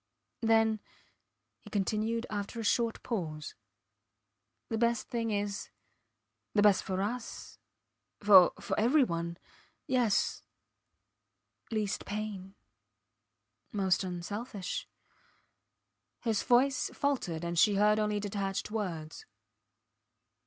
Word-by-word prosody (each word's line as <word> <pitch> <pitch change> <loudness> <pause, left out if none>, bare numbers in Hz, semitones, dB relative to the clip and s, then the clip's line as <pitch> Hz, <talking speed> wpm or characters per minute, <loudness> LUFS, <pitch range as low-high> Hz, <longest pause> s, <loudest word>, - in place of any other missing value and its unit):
Then, 225 -1 +3 0.8
he - - -14
continued 215 +3 0
after 205 +2 -4
a - - -3
short 230 +1 +1
pause, 160 -10 -4 1.1
the 225 - -2
best 235 0 +1
thing 230 -1 -1
is... 205 -1 -2 0.9
the 205 - +5
best 205 -2 +5
for 190 0 -1
us... 235 +3 -5 0.6
for 195 -4 +8 0.3
every 260 +7 +5
one.... 170 -5 -3 0.5
Yes... 245 -5 +1 1.3
least 215 -3 -1
pain 205 -2 -5 1.2
most 190 -2 +1
unselfish.... 195 +3 -4 1.3
His 225 -4 +1
voice 260 +2 +3
faltered, 240 - -1
and 170 -1 0
she 205 +2 +5
heard 210 +1 +4
only 210 -1 +1
detached 200 0 -3
words. 170 -8 -4
210 Hz, 95 wpm, -31 LUFS, 195-230 Hz, 1.3 s, for